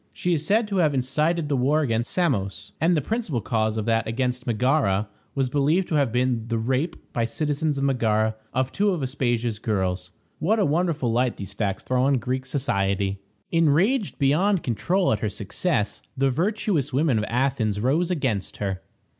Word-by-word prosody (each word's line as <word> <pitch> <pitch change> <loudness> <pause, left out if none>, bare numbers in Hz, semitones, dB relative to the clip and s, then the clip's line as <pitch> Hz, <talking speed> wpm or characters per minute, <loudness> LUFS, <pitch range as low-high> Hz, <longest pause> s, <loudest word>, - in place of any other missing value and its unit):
She 180 - 0
is 155 -2 -1
said 215 +5 +2
to 200 - -1
have 155 -5 +3
incited 150 +5 0
the 145 - 0
war 140 +5 +2
against 115 -4 0
Samos; 120 - -1
and 170 +1 +3
the 150 - 0
principal 220 - -2
cause 110 0 0
of 110 - -2
that 115 -1 +1
against 125 +2 -2
Megara 115 -4 +2 0.3
was 135 -2 +1
believed 150 +7 +2
to - - -2
have 140 -6 +2
been 125 -2 0
the 115 -1 -1
rape, 130 +8 -2
by 115 - +1
citizens 145 +4 -1
of 135 - -1
Megara, 110 -5 +1 0.2
of 130 +1 0
two 205 +1 +1
of 175 -7 -1
Aspasia's 120 -4 -1
girls. 95 -4 -1 0.3
What 215 +7 +2
a 205 - +3
wonderful 155 -5 +1
light 125 +1 +1
these 100 -2 -7
facts 100 -3 -2
throw 125 0 +1
on 135 +1 +3
Greek 130 +2 -3
society! 100 -7 0 0.3
Enraged 175 - +2
beyond 175 +7 +2
control 175 - +1
at 105 - -1
her 105 - -1
success, 105 - -2 0.2
the 135 0 +2
virtuous 170 - 0
women 135 -3 +2
of 105 - -1
Athens 115 -4 0
rose 150 - +1
against 130 - -2
her. 95 -2 -3
130 Hz, 180 wpm, -24 LUFS, 110-155 Hz, 0.3 s, have